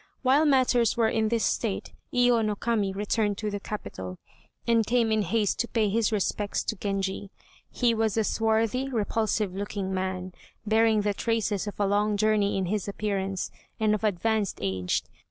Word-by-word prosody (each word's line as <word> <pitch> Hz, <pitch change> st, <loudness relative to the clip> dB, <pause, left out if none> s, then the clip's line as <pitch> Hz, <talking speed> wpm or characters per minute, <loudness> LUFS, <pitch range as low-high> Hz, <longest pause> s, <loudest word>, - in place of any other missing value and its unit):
While 275 Hz, +4 st, +4 dB
matters 255 Hz, -5 st, +3 dB
were 225 Hz, -2 st, +3 dB
in 220 Hz, -1 st, +1 dB
this 230 Hz, -1 st, +1 dB
state 215 Hz, -5 st, -2 dB, 0.2 s
Iyo 245 Hz, -2 st, +4 dB
no 210 Hz, -1 st, 0 dB
Kami 210 Hz, -2 st, 0 dB
returned 205 Hz, +1 st, 0 dB
to 210 Hz, -1 st, -3 dB
the 205 Hz, -, -3 dB
capital, 95 Hz, -, -6 dB, 0.5 s
and 230 Hz, -1 st, +3 dB
came 230 Hz, 0 st, +2 dB
in 220 Hz, 0 st, +3 dB
haste 205 Hz, +2 st, 0 dB
to 235 Hz, -, 0 dB
pay 220 Hz, -4 st, +1 dB
his 225 Hz, +2 st, +1 dB
respects 205 Hz, 0 st, -1 dB
to 220 Hz, -, -2 dB
Genji. 195 Hz, 0 st, -3 dB, 0.4 s
He 240 Hz, -2 st, +1 dB
was 220 Hz, -1 st, 0 dB
a 220 Hz, -, +3 dB
swarthy, 225 Hz, +4 st, +1 dB
repulsive 215 Hz, -4 st, 0 dB
looking 195 Hz, -1 st, -3 dB
man, 185 Hz, -1 st, -3 dB, 0.3 s
bearing 220 Hz, 0 st, +3 dB
the 205 Hz, 0 st, 0 dB
traces 215 Hz, -2 st, -1 dB
of 205 Hz, -, -6 dB
a 205 Hz, -, +3 dB
long 205 Hz, +1 st, +1 dB
journey 210 Hz, -1 st, +2 dB
in 190 Hz, -, 0 dB
his 205 Hz, +2 st, -2 dB
appearance, 195 Hz, -2 st, -2 dB, 0.3 s
and 215 Hz, -1 st, +3 dB
of 215 Hz, -, -2 dB
advanced 215 Hz, 0 st, 0 dB
age. 95 Hz, -2 st, -1 dB
215 Hz, 175 wpm, -27 LUFS, 200-225 Hz, 0.5 s, While